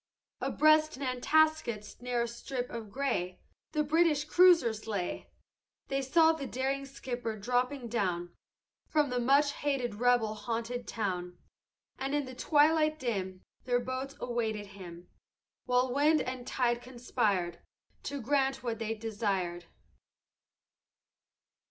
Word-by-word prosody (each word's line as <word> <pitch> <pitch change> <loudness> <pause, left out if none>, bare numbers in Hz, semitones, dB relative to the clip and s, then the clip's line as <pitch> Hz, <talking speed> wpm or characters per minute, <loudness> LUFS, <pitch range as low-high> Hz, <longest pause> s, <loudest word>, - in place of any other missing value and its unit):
"Abreast 310 -1 +3
Nantasket's 260 -4 +1
narrow 245 -1 0
strip 245 +2 -5
of 225 -3 -6
gray 200 -8 -2 0.3
The 300 - +2
British 305 0 +3
cruisers 325 -12 +4
lay: 200 -5 -3 0.6
They 275 0 0
saw 320 +5 +5
the 305 -4 -4
daring 270 +2 -2
skipper 245 -4 -5
dropping 250 +4 -1
down 180 -6 -1 0.5
From 295 -4 +1
the 250 - 0
much 280 +4 +4
hated 275 -5 -1
rebel 235 -1 +2
haunted 235 +1 -4
town, 180 -5 -3 0.6
And 270 +2 -1
in 290 -1 0
the 260 - -8
twilight 305 +3 +3
dim 190 -8 -3 0.2
Their 245 -1 +2
boats 260 +3 -4
awaited 220 -4 -2
him, 175 -2 -10 0.6
While 250 0 +2
wind 300 +3 +4
and 255 -1 -5
tide 240 -2 0
conspired 215 -8 -1 0.5
To 285 0 -3
grant 270 +1 0
what 230 -2 -3
they 225 0 -2
desired. 200 -6 -2
245 Hz, 120 wpm, -31 LUFS, 220-275 Hz, 0.6 s, saw